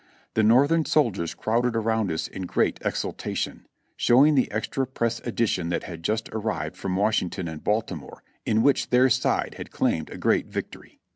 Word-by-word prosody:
The 110 - +2
Northern 140 +9 +4
soldiers 110 - +1
crowded 115 +2 0
around 110 -3 0
us 80 - -2
in 95 -1 -6
great - - +1
exultation, - - -3 0.3
showing 135 +6 +5
the 130 -3 +2
Extra 110 +5 -2
Press 115 -3 -1
Edition 110 -7 -1
that 85 - -1
had 85 -2 -8
just 110 +6 -1
arrived 105 -6 -3
from 90 0 -3
Washington 95 -3 0
and 80 -1 -7
Baltimore, 105 -10 -3 0.2
in 110 +1 +2
which 140 -2 +2
their 125 +1 +4
side 125 +2 +1
had - - -7
claimed 80 - -1
a - - -8
great - - +1
victory. - - -7
110 Hz, 165 wpm, -25 LUFS, 90-125 Hz, 0.3 s, showing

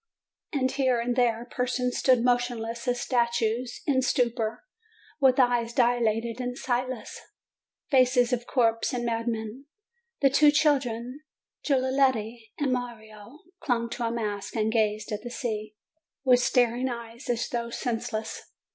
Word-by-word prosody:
And 260 -4 0
here 260 -3 +1
and 240 +1 -1
there 240 -2 +1
persons 250 0 -1
stood 255 -3 +3
motionless 240 -1 -1
as 245 0 +1
statues, 235 0 0
in 265 -3 +2
stupor, 235 -4 0 0.6
with 265 -1 +4
eyes 240 -2 +2
dilated 235 -1 +1
and 250 0 -4
sightless, 255 -1 -3 0.7
faces 255 -2 +4
of 240 0 -2
corpses 230 -3 +1
and 240 -1 -2
madmen. 230 +2 -3 0.6
The 275 -2 +5
two 295 +2 +6
children, 270 -3 +1 0.4
Giulietta 260 -4 +1 0.2
and 275 -3 0
Mario, 235 +1 -7 0.2
clung 235 -3 -1
to 235 0 -3
a - - 0
mast 210 -3 -4
and 220 -1 +1
gazed 215 -1 0
at 210 0 -3
the 240 - -7
sea 215 -4 -4 0.5
with 250 -2 +5
staring 245 +1 +2
eyes, 235 +1 -8
as 240 0 0
though 235 -1 -3
senseless. 225 -2 -3
240 Hz, 135 wpm, -27 LUFS, 230-255 Hz, 0.7 s, two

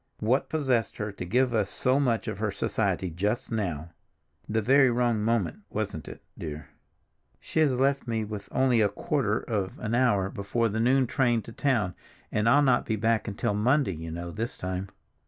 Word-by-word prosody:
"What 125 +6 +1
possessed 130 -8 0
her 105 -1 -3
to 95 - -7
give 125 +6 +2
us 105 -3 +1
so 130 +2 +1
much 120 -5 +1
of 110 - -4
her 110 0 0
society 100 -2 -1
just 105 +10 -2
now—the 90 +3 -5
very 135 +3 +5
wrong 120 -2 +1
moment, 110 -7 0
wasn't - - -4
it, - - -10
dear? 75 -2 -7 0.7
She - - -3
has 140 -5 +3
left 135 0 +1
me 110 -2 -1 0.3
only 130 -3 +3
a 105 - +3
quarter 110 0 0
of 100 -5 -3
an 110 -1 -3
hour 105 -6 +2
before 115 +3 -1
the 110 +2 -2
noon 130 +3 +3
train 120 -2 +1
to - - -10
town, 110 -7 0 0.4
and 105 +2 +2
I'll 145 +4 +5
not 130 -3 +3
be 110 - +1
back 110 +1 +1
until 105 0 -1
Monday, 115 +1 +2
you 80 0 -7
know, 85 +1 -5
this 115 +6 -4
time. 95 +1 -4
110 Hz, 180 wpm, -27 LUFS, 100-125 Hz, 0.7 s, very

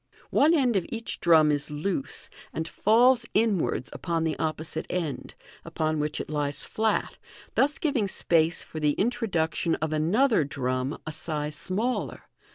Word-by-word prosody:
One 315 +4 +5
end 255 -7 +2
of 190 - 0
each 230 0 -4
drum 160 -3 +5
is 145 0 -1
loose, 150 0 -3 0.2
and 160 0 -3
falls 235 +6 +4
inwards 210 -5 +1
upon 165 -2 -2
the 160 -1 0
opposite 160 0 -3
end, 160 -8 -3 0.3
upon 155 0 -1
which 150 0 -1
it - - -4
lies 145 -2 -1
flat, 220 0 -1 0.3
thus 290 +3 +2
giving 270 -10 0
space 165 -3 +1
for 160 - -7
the 150 -1 +2
introduction 190 -7 0
of 155 0 -2
another 205 - +3
drum, 130 -1 -2
a 155 - -4
size 150 -1 -2
smaller. 220 +11 -2
165 Hz, 150 wpm, -27 LUFS, 150-220 Hz, 0.3 s, One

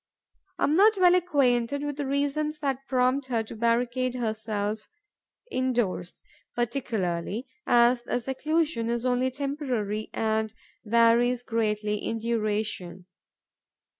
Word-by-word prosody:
I - - -2
am 295 - +3
not 420 +3 +5
well 360 -1 +6
acquainted 285 -6 +2
with 290 -1 -3
the 290 -2 -2
reasons 285 +2 -1
that 270 -1 -2
prompt 255 +1 +1
her 230 -3 0
to 220 - -9
barricade 240 +2 0
herself 215 -2 -3 0.6
indoors, 240 - -1 0.3
particularly 225 -4 -2 0.2
as 240 0 +5
the 245 - -2
seclusion 270 0 -1
is 235 +1 -1
only 250 +1 +2
temporary 255 -6 -3
and 220 0 -1 0.3
varies 235 +2 +3
greatly 210 -2 -1
in 225 +2 -3
duration. 215 -5 -2
240 Hz, 115 wpm, -27 LUFS, 220-270 Hz, 0.6 s, well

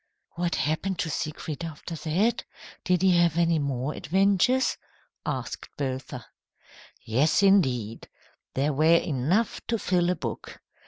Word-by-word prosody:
"What 175 0 -2
happened 160 +5 -1
to 160 - -2
Siegfried 155 +1 -4
after 165 +1 -7
that? 175 +8 0 0.4
Did 180 0 +1
he 185 -2 +5
have 170 -2 +3
any 170 -1 +3
more 140 0 -2
adventures?" 200 - +2 0.5
asked - - -4
Bertha. 130 -3 -4 0.8
"Yes, 140 - +2
indeed. 130 - +2 0.5
There 145 +3 +1
were 160 +4 +5
enough 165 - 0
to 230 - 0
fill 180 -4 +1
a 180 - +1
book. 120 -8 -6
165 Hz, 125 wpm, -26 LUFS, 140-180 Hz, 0.8 s, he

